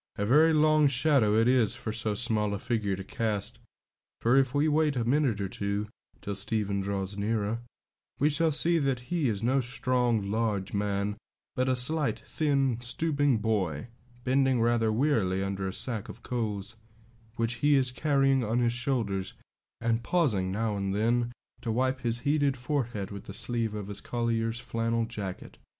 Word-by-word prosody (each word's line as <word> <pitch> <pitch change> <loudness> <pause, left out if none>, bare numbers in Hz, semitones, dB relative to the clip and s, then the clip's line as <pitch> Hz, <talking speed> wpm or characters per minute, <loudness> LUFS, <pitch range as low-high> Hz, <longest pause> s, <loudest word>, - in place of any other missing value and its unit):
A 100 - -1
very 155 +8 +5
long 155 -1 +4
shadow 135 -5 +3
it 115 +1 +4
is 125 -4 +3
for 110 - -5
so 110 -1 -1
small 105 -2 0
a - - -3
figure 105 -2 -1
to 95 - -7
cast, 105 0 -2 0.6
for 120 +3 +3
if 135 -2 +4
we 145 +2 +3
wait 155 -1 +2
a 120 -2 -1
minute 130 -4 +2
or 100 - -1
two 100 +2 -3 0.3
till 100 - -4
Stephen 100 0 -1
draws 100 0 -3
nearer, 110 +1 -1 0.6
we 145 - +4
shall 160 +2 +2
see 165 +3 +4
that 130 -3 -2
he 160 -7 +1
is 105 -1 -3
no 130 +3 +2
strong, 120 -4 0
large 105 -3 -1
man, 100 0 -1 0.4
but 130 +1 +1
a 130 - +2
slight, 145 +4 +2
thin, 135 -6 0
stooping 145 +1 +1
boy, 105 -4 -1 0.3
bending 130 -1 +2
rather 115 -1 +2
wearily 110 -7 +1
under 95 0 -3
a - - -2
sack 115 -4 -3
of 115 - -11
coals, 110 -3 -3 0.6
which 115 +1 -1
he 145 0 +4
is 130 -2 +2
carrying 135 -1 +2
on 115 +2 0
his 120 -1 +2
shoulders, 115 -7 -2 0.4
and 115 0 0
pausing 115 - +1
now 110 +1 -1
and 100 -1 -2
then 120 +3 +1 0.3
to 115 - -2
wipe 130 +3 0
his 120 0 0
heated 145 -2 +1
forehead 120 -7 -2
with 100 -1 -8
the 100 - -8
sleeve 115 -3 -2
of 105 -2 -4
his 100 0 -4
collier's 115 -1 -1
flannel 115 -1 -1
jacket. 100 -5 -7
115 Hz, 170 wpm, -28 LUFS, 105-130 Hz, 0.6 s, very